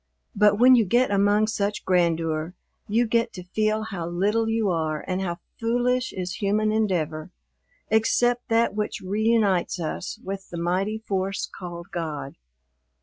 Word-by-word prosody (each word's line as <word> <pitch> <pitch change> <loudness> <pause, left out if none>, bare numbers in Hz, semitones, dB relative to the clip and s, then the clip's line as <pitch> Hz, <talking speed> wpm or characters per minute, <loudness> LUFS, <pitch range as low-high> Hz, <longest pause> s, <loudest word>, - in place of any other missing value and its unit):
But 210 0 +4
when 250 +3 +7
you 235 - +5
get 240 +4 +2
among 205 +2 +3
such 210 -1 -2
grandeur 165 -2 +1 0.3
you 230 +3 +2
get 230 +1 +1
to 180 - -8
feel 215 +4 0
how 190 -6 -5
little 205 +6 +1
you 225 -1 +1
are 155 -2 -2
and 185 0 -1
how 175 -3 -2 0.2
foolish 245 +2 +1
is 180 -1 -4
human 210 +1 +1
endeavor, 170 -8 -1 0.6
except 240 +3 +2
that 230 -1 +2
which 210 0 -3
reunites 205 -2 +1
us 160 -2 -4
with 195 0 -6
the 170 - -6
mighty 185 +5 0
force 195 -3 -2
called 175 -2 -9
God. 155 -5 -4
200 Hz, 145 wpm, -25 LUFS, 175-220 Hz, 0.6 s, when